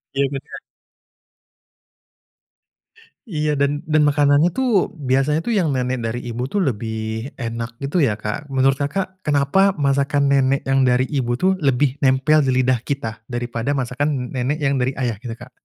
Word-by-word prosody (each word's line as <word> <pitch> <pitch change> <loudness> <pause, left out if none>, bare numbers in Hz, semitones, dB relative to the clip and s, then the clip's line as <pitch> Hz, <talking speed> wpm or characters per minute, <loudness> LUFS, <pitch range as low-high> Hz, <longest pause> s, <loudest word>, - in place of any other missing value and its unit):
Iya 140 0 +2
benar. 135 - -7 2.7
Iya, 155 -6 -1
dan 145 +1 0
dan 155 0 +2
makanannya, 145 +2 +4
tuh, 245 -10 +1
biasanya 145 +2 +1
itu 235 - -2
yang 175 - +1
nenek 125 0 -1
dari 115 +2 -2
ibu 120 +1 -4
itu 205 - -3
lebih 110 -2 -3
enak 115 -1 -5
gitu, 145 +6 0
ya, 120 -9 +2
Kak. 105 +8 -5
Menurut 135 0 +2
Kakak, 185 +6 -3
kenapa 150 +7 +3
masakan 140 0 +1
nenek 135 0 +3
yang 135 -1 +2
dari 125 +1 +3
ibu, 120 -2 0
tuh, 185 +9 +2
lebih 140 -1 +1
nempel 135 +3 +3
di 135 -3 +2
lidah 130 -1 +2
kita 115 -3 -4
daripada 120 +2 -2
masakan 130 0 -2
nenek 130 +3 -1
yang 140 -1 +1
dari 130 +2 0
ayah, 120 -6 -2
gitu, 115 -1 -6
Kak? 120 +1 -13
135 Hz, 155 wpm, -20 LUFS, 125-145 Hz, 2.7 s, makanannya